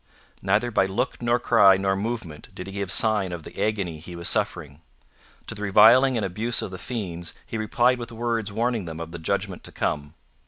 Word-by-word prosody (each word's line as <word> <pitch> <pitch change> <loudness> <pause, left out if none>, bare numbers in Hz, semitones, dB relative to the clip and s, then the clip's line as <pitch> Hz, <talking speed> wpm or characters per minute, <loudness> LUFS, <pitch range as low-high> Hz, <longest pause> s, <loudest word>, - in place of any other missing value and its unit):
Neither 105 +5 +1
by 95 -3 +2
look 95 +5 -2
nor 120 0 +2
cry 115 -5 +5
nor 95 0 0
movement 100 -7 -5
did 90 - -7
he 95 - -9
give 100 -2 -2
sign 105 -2 +2
of 85 -2 -6
the - - -8
agony 100 -7 -2
he 85 +3 -9
was 85 0 -2
suffering. 85 -9 -1 0.6
To - - -5
the 105 - -9
reviling 115 +6 +6
and 105 - -1
abuse 110 +6 0
of - - -6
the 95 - -7
fiends 90 -8 -5
he - - -7
replied 120 +3 +2
with 120 0 -7
words 115 -2 -2
warning 115 -1 -1
them 80 -1 -7
of 85 0 -7
the 85 - -7
judgment 80 - -2
to - - -8
come. 75 +2 -3
100 Hz, 205 wpm, -24 LUFS, 90-115 Hz, 0.6 s, reviling